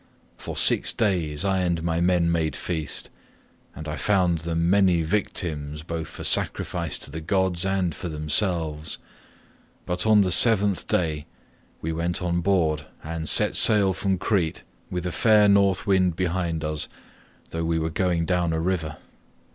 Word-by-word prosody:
For - - -8
six - - +3
days 90 -6 -1
I 95 -1 +1
and 85 -2 -1
my 85 0 -1
men 85 -1 +2
made 80 -4 -1
feast, 80 -5 -4 0.6
and 80 - -8
I 75 0 -4
found 90 +1 +1
them 85 +1 -1
many 90 -3 +3
victims 75 -5 -3
both 80 0 -5
for - - -9
sacrifice - - 0
to - - -9
the 80 +2 -6
gods 95 +1 0
and 95 -3 0
for 90 +3 -6
themselves, 80 0 -1 0.9
but 90 +4 -1
on 105 -1 +6
the 95 -2 +1
seventh 105 -2 +4
day 80 -4 -1 0.6
we 80 +1 -2
went 85 +1 -1
on 85 -1 -1
board 80 -6 0 0.2
and 80 0 -4
set - - +3
sail 100 -3 +5
from 95 +1 -1
Crete 90 -5 -1 0.3
with 90 -1 -4
a 90 - -2
fair 105 +1 +4
North 100 -2 +3
wind 95 -4 +2
behind 85 -2 -2
us 75 -1 -2 0.6
though 80 0 -3
we 80 0 0
were 80 0 -2
going 85 0 0
down 90 -1 0
a 80 - -1
river. 80 -3 -2
85 Hz, 160 wpm, -24 LUFS, 80-95 Hz, 0.9 s, on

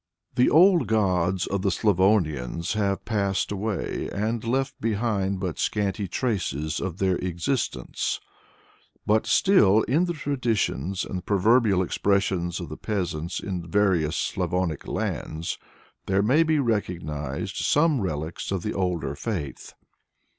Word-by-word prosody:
The 125 - +4
old 175 - +5
gods 95 -4 +1
of 100 -1 -2
the 100 - +1
Slavonians 85 - +1
have 100 -2 -1
passed 100 -4 0
away 105 -2 -3
and 110 +2 -2
left 135 +3 -1
behind 105 -3 0
but 90 -4 -3
scanty 100 -1 -1
traces 85 - -2
of 90 -2 -4
their 95 -2 +1
existence; 90 +9 -2 0.9
but 110 +1 +2
still, 110 - +5
in 155 +8 +2
the 175 - -2
traditions 115 - -1
and 90 -1 -5
proverbial 105 0 +3
expressions 95 -2 0
of - - -6
the - - -7
peasants 90 -5 -3
in 90 -4 -5
various 85 -5 +2
Slavonic 90 -5 -1
lands, 80 +2 -3 0.5
there 95 +1 +2
may 130 +9 +4
be 160 -1 +2
recognized 85 - -2
some 150 -3 +2
relics 80 -2 -3
of 95 -3 -2
the 105 - -2
older 90 -7 -1
faith. 80 -4 -5
100 Hz, 125 wpm, -25 LUFS, 85-110 Hz, 0.9 s, old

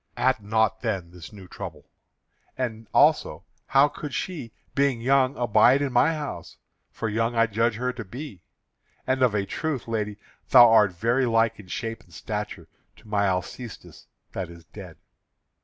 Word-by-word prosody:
Add 130 -3 +2
not 110 +1 +1
then 95 -7 -3
this 90 -2 -11
new 100 -3 -12
trouble. - - -8 0.7
And 115 -4 -4
also - - +3 0.2
how 140 +1 +5
could 145 -1 -7
she, 155 -11 -4 0.2
being 140 -3 +1
young, 130 +2 +2
abide 120 +3 +4
in 135 -3 -2
my 155 +6 +3
house, 150 -2 -7 0.3
for 110 - -4
young 115 +2 -1
I 115 0 +4
judge 115 +1 0
her 125 +2 -2
to 120 - -6
be? 115 - -9 0.6
And 130 0 0
of 125 -4 +3
a 100 -1 0
truth, 150 +2 -3
lady, 105 -2 -2 0.3
thou 120 - +9
art 105 -4 +5
very 120 +8 +1
like 115 -1 +2
in 100 - -12
shape 115 +4 -5
and 90 - -24
stature 105 +3 -5 0.3
to 110 - -20
my 100 -1 +1
Alcestis 95 +4 -5 0.2
that 95 -3 -5
is 85 -1 -13
dead. - - -11
115 Hz, 165 wpm, -25 LUFS, 105-130 Hz, 0.7 s, thou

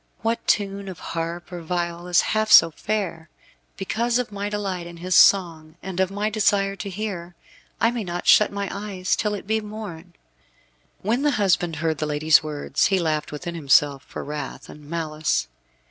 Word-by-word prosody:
What 225 +1 -1
tune 200 -1 0
of 185 - -8 0.2
harp 170 +2 -4
or 175 -1 -6
viol 170 +1 -3
is 175 -1 +4
half 215 0 0
so 165 0 +8
fair! 175 -3 -3 0.5
Because 235 +5 0
of 250 -3 -2
my 205 0 -3
delight 195 -4 -3
in 170 0 -10
his 180 +2 -3
song, 165 -6 +4
and 190 -1 -5
of 190 -1 +2
my 205 +2 -2
desire 200 -2 +1
to 195 +2 -5
hear, 185 -3 -5 0.4
I 230 - +3
may 240 -2 -3
not 175 -1 -5
shut 210 - +6
my 200 0 -3
eyes 195 -2 -2
till 210 -1 -1
it 205 - -8
be 220 +2 0
morn." 200 -5 -9 0.9
When 230 +6 +1
the 295 - +3
husband 180 -5 +1
heard 160 0 -1
the 155 - -1
lady's 150 +1 +4
words 150 -2 0
he 195 - +2
laughed 155 -3 -1
within 170 +4 -5
himself 145 -3 +3
for - - -7
wrath 145 -1 -6
and 150 -1 -13
malice. 155 -2 -1
180 Hz, 180 wpm, -23 LUFS, 165-205 Hz, 0.9 s, so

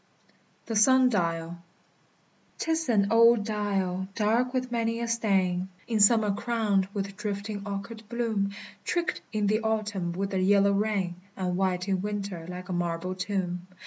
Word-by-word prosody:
THE 225 - -3
SUN 260 +4 +6
DIAL. 170 -4 -1 1.0
'T 325 - -1
is 320 -3 0
an 205 -3 +3
old 230 -1 +6
dial, 195 -3 -1
dark 230 +4 +2
with 255 -1 -2
many 230 -1 0
a 235 - -2
stain; 190 -5 +1 0.2
In 225 -2 0
summer 210 0 +5
crowned 210 -3 0
with 200 -1 -4
drifting 205 0 -4
orchard 200 +3 -5
bloom, 225 -4 0 0.3
Tricked 345 0 -1
in 215 -2 0
the 215 +2 +2
autumn 210 -5 -1
with 195 +2 -2
the 190 - 0
yellow 200 +1 +4
rain, 200 -4 0 0.2
And 180 -2 -1
white 185 0 0
in 190 -2 0
winter 200 -5 -4
like 180 0 -7
a 185 - -3
marble 175 +1 -2
tomb. 185 -2 -3
200 Hz, 155 wpm, -28 LUFS, 185-225 Hz, 1.0 s, SUN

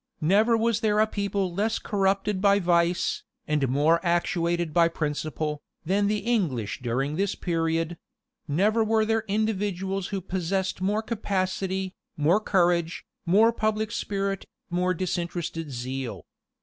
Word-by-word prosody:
Never 210 +8 +4
was 230 -1 +1
there 215 -2 +1
a 215 - +6
people 200 -3 -2
less 215 +4 0
corrupted 195 -1 0
by 200 0 +5
vice, 175 -2 +1 0.3
and 150 -4 +1
more 155 +6 +3
actuated 170 -1 0
by 170 -1 +5
principle, 150 -1 -3 0.2
than 200 +4 +2
the 210 +1 +1
English 150 - 0
during 135 +5 -1
that 200 +1 -1
period: 165 -1 -1 0.5
never 205 +9 +2
were 220 0 +2
there 225 0 +1
individuals 195 -2 -1
who 200 - -3
possessed 190 +1 -2
more 205 +3 +1
capacity, 190 -3 -2 0.2
more 160 +7 +3
courage, 175 -5 +1 0.2
more 220 +6 +5
public 215 0 -1
spirit, 195 -3 -2 0.2
more 180 +1 +1
disinterested 170 -3 -3
zeal. 130 0 -5
185 Hz, 130 wpm, -26 LUFS, 165-205 Hz, 0.5 s, a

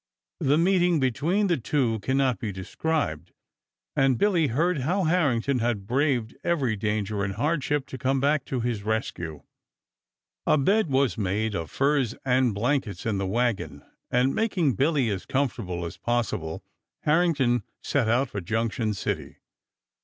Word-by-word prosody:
The 140 +2 +3
meeting 175 -1 +3
between 150 - +1
the 175 -4 +2
two 120 -3 0
can 130 +6 -1
not 130 -3 +2
be 110 -4 -3
described, 95 - -2 0.6
and 135 -2 +3
Billy 175 - +3
heard 160 +7 +1
how 180 +9 0
Harrington 140 -7 +2
had 115 -4 -1
braved 125 -1 0
every 140 -10 +1
danger 105 -1 -1
and 95 0 -2
hardship 145 +2 0
to 130 - -8
come 135 +2 +1
back 145 +1 +2
to 130 -3 -2
his 115 -3 -2
rescue. 90 - -3 1.0
A - - +5
bed 195 +6 +2
was 135 -3 +1
made 105 +2 0
of 85 -4 -3
furs 135 -4 +1
and 125 -4 +2
blankets 110 -4 -1
in 105 -3 0
the 95 - -1
wagon 120 +1 -1 0.3
and 125 +2 +2
making 185 - +1
Billy 140 - +2
as 95 -2 -4
comfortable 115 -10 -1
as 85 - -7
possible 115 -9 -2 0.4
Harrington 150 -7 +2 0.2
set 125 -6 +1
out 125 +4 +2
for 100 - -4
Junction 110 +2 -1
City. - - -4
125 Hz, 150 wpm, -26 LUFS, 110-145 Hz, 1.0 s, A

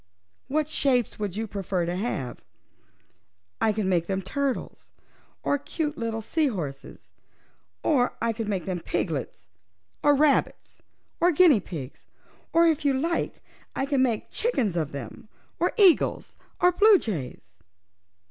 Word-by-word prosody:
"What 300 +2 0
shapes 260 -8 +1
would 205 -3 -3
you 220 +2 -2
prefer 195 -4 -2
them 175 +1 -2
to 185 - -3
have? 135 - -4 1.2
I 220 - +4
can 210 -2 -2
make 175 -3 +1
them 195 -1 -2
turtles, 275 +7 -3 0.5
or 285 - +1
cute 300 +1 -3
little 225 -2 -3
sea 315 +6 +1
horses; 150 - -6 0.8
or 255 -5 +2
I 230 0 0
could 225 -1 -4
make 195 -3 -2
them 185 -2 -2
piglets, 165 -4 -3 0.6
or 290 0 +5
rabbits, 290 0 +1 0.4
or 350 +1 +4
guinea 315 - +6
pigs; 155 -8 -8 0.4
or, 335 +1 +5
if 320 -2 +2
you 285 -1 +3
like 330 +6 -2 0.3
I 270 - 0
can 275 -2 +1
make 235 -4 0
chickens 260 - 0
of 160 -4 -1
them, 140 - -8 0.3
or - - +2
eagles, 385 -6 +3 0.2
or 360 - +5
bluejays." 220 - +1
230 Hz, 140 wpm, -26 LUFS, 185-295 Hz, 1.2 s, guinea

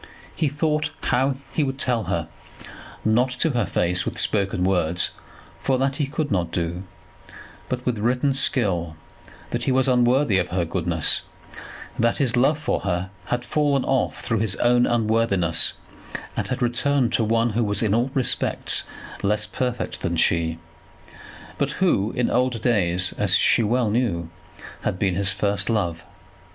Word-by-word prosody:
He 160 - +1
thought 150 +2 0
how 130 +2 +1 0.2
he 155 - +1
would 135 -1 -2
tell 125 -4 0
her, - - -2 0.8
not 120 +4 +3
to 160 - +2
her 120 -5 0
face 90 +1 +1
with - - -4
spoken 100 -3 +1
words, 90 -2 +1 0.5
for 130 - +1
that 135 +1 0
he 145 - 0
could 150 0 -3
not 90 -4 0
do, 85 +1 -2 0.9
but 125 0 -3
with 120 -4 -1
written 125 +5 +1
skill, 95 -11 0 0.6
that - - -2
he - - +2
was 130 +1 +3
unworthy 125 -3 +3
of 90 - -2
her 90 -1 0
goodness, 85 -2 0 0.8
that 115 0 +2
his 130 -4 +1
love 135 +5 +3
for 150 - -1
her 95 -1 -2
had 120 0 -2
fallen 145 -1 +1
off 135 - 0
through 115 -3 -1
his 105 -3 +1
own 120 +2 +3
unworthiness, 110 -7 +1 0.6
and - - -2
had 125 0 -2
returned 125 +1 +1
to 115 - +2
one 115 +2 +1
who 115 +3 0
was 105 0 0
in 105 -2 +1
all 120 +4 +1
respects 130 -3 +1 0.4
less 105 +1 +1
perfect 125 +2 -3
than 85 0 -1
she, 80 0 +1 1.0
but 140 - +1
who 130 - +1
in 125 - 0
old 125 -1 +1
days, 90 -6 +1
as - - +4
she - - +4
well 115 0 +1
knew, 90 -9 -1 0.5
had - - -2
been 95 -1 +1
his 100 +2 +1
first 100 +2 -1
love. 90 -7 -1
115 Hz, 160 wpm, -23 LUFS, 95-130 Hz, 1.0 s, as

